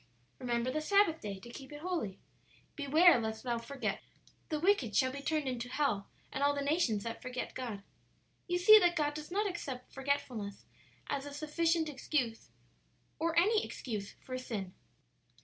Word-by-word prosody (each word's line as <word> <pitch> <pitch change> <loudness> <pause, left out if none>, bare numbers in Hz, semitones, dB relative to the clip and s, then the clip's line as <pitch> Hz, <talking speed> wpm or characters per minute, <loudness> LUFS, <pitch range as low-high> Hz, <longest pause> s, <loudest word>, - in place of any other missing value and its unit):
"'Remember 240 0 0
the 310 +3 -1
Sabbath 395 -1 +3
day, 200 -2 -5
to 240 - -10
keep 265 +2 -10
it 295 0 -8
holy.' 330 - -2 0.6
"'Beware 305 +1 +6
lest 220 -1 -3
thou 240 -2 -1
forget 260 +4 -3 0.5
the 310 - 0
Lord.' 300 - -3
"'The - - +2
wicked 270 - +3
shall 260 0 +4
be 280 +2 -6
turned 305 -1 0
into 245 -1 -3
hell, 255 -7 0 0.2
and 270 - -3
all 285 0 +4
the 280 - -1
nations 280 - +1
that 230 0 -5
forget 255 -1 -4
God.' 225 -6 -5 0.6
"You 355 0 +1
see 430 +5 +9
that 350 -3 +3
God 295 -2 +1
does 305 0 -7
not 410 +4 +1
accept 275 -9 -6
forgetfulness 260 -7 -2 0.4
as 280 0 -3
a 285 - -7
sufficient 325 +2 +1
excuse, 260 -5 -2 0.7
or 330 +1 0
any 420 +5 +4
excuse 210 -5 -5
for 255 - -4
sin." 200 -7 -5
280 Hz, 175 wpm, -33 LUFS, 235-320 Hz, 0.7 s, see